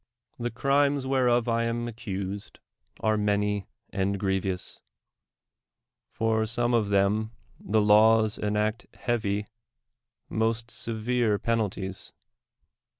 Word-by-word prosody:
The 120 0 -1
crimes 140 +2 +2
whcnof 125 -3 +2
I 115 0 +1
am 120 0 -2
accused 100 -3 -5 0.4
are 110 -1 +2
many 105 -1 0 0.2
and 100 0 -1
grievous; 95 -2 -1 1.3
for 110 0 0
some 120 +2 0
of 110 -3 +2
them 100 +3 +2 0.3
the 110 +1 +1
laws 110 +1 +5
enact 105 +2 -1 0.2
hea\y 105 -4 0 0.5
— - - -59 0.2
most 115 +1 -1
severe 115 -1 0
penalties. 100 -4 -2
110 Hz, 100 wpm, -27 LUFS, 100-120 Hz, 1.3 s, laws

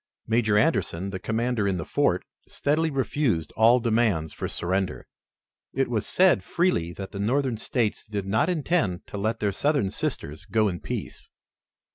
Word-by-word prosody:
Major 110 -2 +2
Anderson, 100 - +1
the 95 - -4
commander 115 +1 0
in 95 -2 0
the 80 - -4
fort, - - +1 0.2
steadily 155 +3 0
refused 130 - 0
all 115 +3 +5
demands 110 -9 +1
for - - -4
surrender. 95 +2 -2 0.7
It 135 -1 +1
was 110 -4 -1
said 185 0 +4
freely 170 - 0
that 95 +1 -7
the 100 - -6
Northern 125 +3 +1
States 110 -1 -1
did 105 -2 -3
not 110 - +1
intend 155 - 0
to - - -7
let 110 +2 -1
their 105 -1 +1
Southern 140 -2 +1
sisters 75 +2 -4
go 110 -1 +2
in 85 -2 -4
peace. - - -6
110 Hz, 160 wpm, -26 LUFS, 95-130 Hz, 0.7 s, all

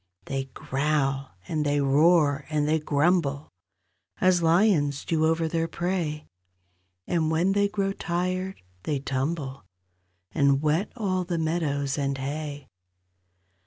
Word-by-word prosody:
They 135 -1 -3
growl, 135 - -1
and 155 -2 -1
they 145 0 +1
roar, 145 +1 +3
and 150 -1 0
they 160 +1 +2
grumble, 150 -1 +1 0.7
As 185 -1 +4
lions 165 -5 +3
do 160 -1 +2
over 165 0 +1
their 165 0 -1
prey, 170 -4 -2 0.8
And 160 -3 0
when 165 +4 +2
they 200 +1 +3
grow 195 -1 -1
tired 185 - -3 0.2
they 145 +8 -1
tumble 135 +1 -3 0.7
And 140 -1 +3
wet 155 +7 0
all 190 -6 -1
the 175 -1 -2
meadows 150 -4 -1
and 140 -1 -1
hay. 145 +1 -5
155 Hz, 125 wpm, -26 LUFS, 140-175 Hz, 0.8 s, As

